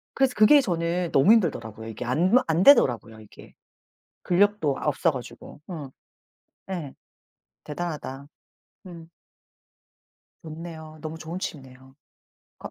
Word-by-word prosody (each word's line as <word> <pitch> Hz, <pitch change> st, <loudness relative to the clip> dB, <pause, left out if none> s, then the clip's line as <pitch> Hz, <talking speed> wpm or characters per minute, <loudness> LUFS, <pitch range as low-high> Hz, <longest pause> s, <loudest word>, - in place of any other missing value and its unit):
그래서 270 Hz, -2 st, +2 dB
그게 215 Hz, +8 st, +6 dB
저는 175 Hz, -4 st, -2 dB
너무 140 Hz, +10 st, +5 dB
힘들더라고요. 115 Hz, -, -1 dB
이게 115 Hz, +2 st, -7 dB
안 165 Hz, -, +1 dB
안 165 Hz, +2 st, +1 dB
되더라고요, 120 Hz, -, +4 dB
이게. 110 Hz, -1 st, -16 dB, 0.7 s
근력도 185 Hz, -6 st, +1 dB
아 -, -, -6 dB
없어 155 Hz, +3 st, +1 dB
가지고. 125 Hz, 0 st, -10 dB
음. 150 Hz, -6 st, -7 dB, 0.8 s
예. 170 Hz, -8 st, -5 dB, 0.7 s
대단하다. 150 Hz, -4 st, -6 dB, 0.6 s
음. 170 Hz, -2 st, -11 dB, 1.3 s
좋네요. 160 Hz, -1 st, -9 dB
너무 160 Hz, +1 st, -6 dB
좋은 165 Hz, +3 st, -6 dB
취미네요. 130 Hz, -5 st, -9 dB, 0.6 s
거 -, -, -9 dB
160 Hz, 255 characters per minute, -25 LUFS, 135-175 Hz, 1.3 s, 그게